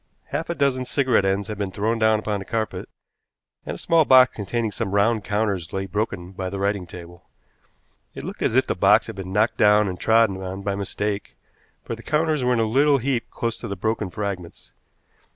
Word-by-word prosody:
Half 150 +5 -3
a 170 - -1
dozen 135 -3 +1
cigarette 130 -6 +1
ends 95 +1 0
had 105 -2 -6
been 100 -2 -1
thrown 110 +4 -1
down 110 -1 +4
upon 105 -1 -2
the 95 - -8
carpet, 110 -1 -3 0.8
and - - -3
a - - -8
small 165 -1 +3
box 130 -3 +6
containing 110 +2 -2
some 100 -2 -3
round 110 +1 +2
counters 105 -6 -1
lay 95 0 -2
broken 95 -2 -3
by 95 -1 -4
the 100 - -5
writing 100 -2 -1
table. 85 +1 -12 0.9
It - - -7
looked - - -7
as - - +1
if - - +4
the - - -1
box - - +4
had - - -7
been 95 -2 -7
knocked 105 +4 +1
down 105 0 +5
and 90 -2 -5
trodden 110 -4 +3
on 95 +1 -6
by 100 - -1
mistake, 100 +1 -3 0.5
for - - -5
the 115 - -12
counters 155 0 0
were 125 - +2
in 120 - +1
a 115 - +2
little 140 +6 +3
heap 125 -1 -2
close 115 -1 -3
to 115 - -6
the 100 - -4
broken 110 +1 -2
fragments. 95 -4 -6
105 Hz, 210 wpm, -23 LUFS, 95-115 Hz, 0.9 s, box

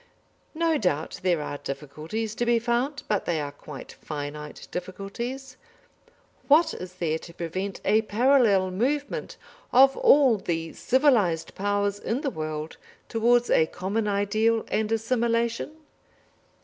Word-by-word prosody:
No 325 -2 +1
doubt 160 -6 -1
there 175 -4 +1
are 145 -1 -5
difficulties 155 +10 -5
to 240 - -2
be 240 0 +3
found, 245 +5 -1
but 210 -2 0
they 165 -2 0
are 145 -1 -4
quite 145 -1 -10
finite 150 0 -6
difficulties. 235 +9 -6 0.9
What 320 +3 +5
is 180 0 -8
there 160 -3 -1
to 170 - -12
prevent 185 +4 -4
a 215 +2 +4
parallel 220 -4 +3
movement 275 +9 -2 0.3
of 270 +2 +6
all 265 -7 +5
the 165 -3 -3
civilised 235 - +2
Powers 205 0 -1
in 245 +5 -2
the 280 -4 -1
world 155 -2 -5 0.3
towards 240 +2 +3
a 160 - +4
common 205 +6 -2
ideal 215 +3 +1
and 215 0 0
assimilation? 230 +2 0
210 Hz, 130 wpm, -26 LUFS, 170-240 Hz, 0.9 s, of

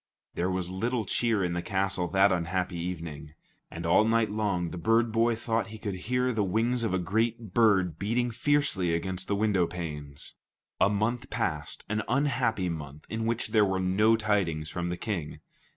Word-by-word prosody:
There 90 +2 -1
was 90 -1 -2
little 115 +4 -1
cheer 110 0 +1
in 90 -1 -1
the 85 - -1
castle 95 -2 -1
that 95 +2 +4
unhappy 90 +1 -1
evening. 80 -3 -6 0.3
And - - -7
all - - +5
night 115 -1 +2
long, 100 -5 -1
the 90 - -6
bird 115 +6 +3
boy 115 +1 +2
thought 115 0 -1
he 110 0 -9
could 105 -2 -4 0.2
hear 125 0 +1
the 110 -2 +1
wings 115 +6 +1
of 115 - 0
a 95 - +1
great 110 +3 -1
bird 95 -8 +3
beating 120 +4 0
fiercely 115 - +1
against 95 +2 -3
the 100 - +1
window 100 -4 +2
panes. 75 -5 -6 0.5
A - - +5
month 110 +4 -1
passed, - - -2
an 105 +1 -1
unhappy 125 -7 +1
month 75 -3 -6
in 110 0 -2
which 115 -1 -1
there 110 -1 +4
were 95 -1 +1
no 100 +5 +3
tidings 95 -8 0
from 85 0 -3
the 90 - -3
King. 85 -9 -4
100 Hz, 185 wpm, -28 LUFS, 90-115 Hz, 0.5 s, all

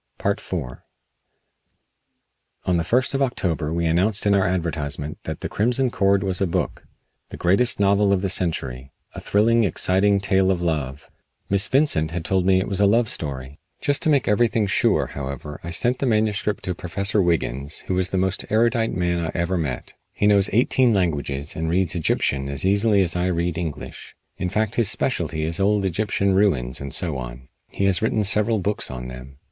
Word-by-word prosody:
IV - - -1 2.1
On 90 -1 +2
the 85 - 0
first 125 +11 +1
of 135 - -1
October 85 - -1
we 85 +1 -1
announced 95 +7 +1
in 100 - +4
our 100 -2 +3
advertisement 75 -4 -3
that - - -5
"The - - -3
Crimson 125 +4 +1
Cord" 100 -1 +2
was 95 -1 -1
a 95 - +2
book; 85 - -3 0.4
the - - -9
greatest 100 +8 +2
novel 100 0 +3
of 95 -2 +2
the - - +1
century; 70 -8 -3 0.2
a - - -7
thrilling, 115 +3 +2
exciting 100 +2 +2
tale 95 -1 +2
of 95 -2 +1
love. 75 -5 -3 0.4
Miss 100 +1 +3
Vincent 130 - +2
had 85 0 -5
told 95 0 +1
me 95 -1 +4
it 95 - -2
was 100 0 0
a 100 - +5
love 115 +2 +2
story. 70 -2 -4 0.2
Just 145 -1 0
to - - +3
make 140 -4 +2
everything 110 0 +2
sure, 100 - +2
however, 70 +1 -7
I 85 - -6
sent 120 +9 +1
the 135 - 0
manuscript 105 -2 0
to 90 - -2
Professor 100 +4 0
Wiggins, 75 -5 -1
who 95 0 -1
is 95 0 +1
the 95 - -1
most 95 0 0
erudite 115 +1 +1
man 85 -2 0
I 80 - -3
ever 85 +2 -1
met. 75 -8 -3 0.2
He - - -1
knows 100 -1 +4
eighteen 120 +1 +3
languages, 75 -5 -2
and 80 0 -2
reads 90 -1 +1
Egyptian 70 -5 -1
as 70 +5 -2
easily 100 +1 +3
as 85 -1 -2
I 90 +1 0
read 85 -1 -1
English. 85 -4 -6 0.2
In 90 - -1
fact 110 +2 -1
his 115 -4 +3
specialty 80 - -1
is 80 +3 -2
old 100 0 +2
Egyptian 100 +1 0
ruins 75 -12 +1
and 70 0 -6
so 80 -2 -2
on. - - -9 0.2
He 100 - -2
has 95 -2 +2
written 110 -1 +1
several 105 +2 +2
books 100 +1 -2
on 60 -1 -6
them. 65 +2 -10
95 Hz, 190 wpm, -22 LUFS, 80-105 Hz, 2.1 s, a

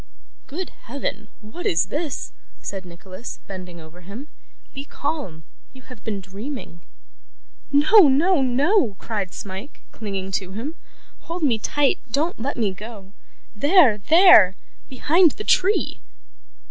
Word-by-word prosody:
'Good 350 +5 -5 0.2
Heaven, 240 -4 -4
what 220 +12 -6
is 165 - +1
this?' 300 -1 -3 0.3
said 195 -2 -6
Nicholas, 185 +6 -9
bending 180 -3 -9
over 160 +2 -14
him. 215 - -10 0.4
'Be 275 - -6
calm; 285 - -5 0.3
you 260 -1 -15
have 255 -4 -14
been 210 -3 -3
dreaming.' 195 - -8 0.9
'No, 310 +6 +7
no, 300 +5 +3
no!' 265 - +2
cried 200 -4 -4
Smike, 195 +7 -8
clinging 195 -3 -5
to 190 -1 -3
him. 245 +10 -5 0.6
'Hold 340 0 -4
me 240 -7 +2
tight. 285 +5 +1
Don't 305 +5 -1
let 280 +4 -3
me 210 -5 0
go. 200 -1 -11 0.4
There, 285 - +5
there. 310 - +7 0.3
Behind 315 +5 +3
the 425 - -7
tree! 400 0 +2
240 Hz, 130 wpm, -22 LUFS, 195-295 Hz, 0.9 s, No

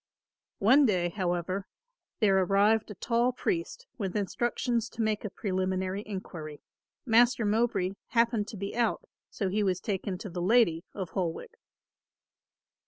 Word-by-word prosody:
One 260 +7 +5
day, 180 -4 +1
however, 185 +1 -2 0.5
there 200 -3 +4
arrived 205 +4 +3
a 210 - -7
tall 235 +5 +1
priest 350 - -3
with 190 -4 -3
instructions 235 +3 -1
to 230 - -5
make 215 -1 0
a 210 - -3
preliminary 185 -1 -2
enquiry. 165 -7 -7 0.4
Master 235 -1 +4
Mowbray 205 -3 +1 0.2
happened 230 -3 +2
to 220 - -7
be 200 +2 -5
out, 235 -2 0 0.2
so 195 - -2
he 210 +3 0
was 185 -3 +1
taken 190 -1 -3
to 205 +2 -7
the 175 0 -4
lady 180 -4 +3
of 190 -4 -5
Holwick. 170 -4 -3
205 Hz, 140 wpm, -29 LUFS, 185-230 Hz, 0.5 s, One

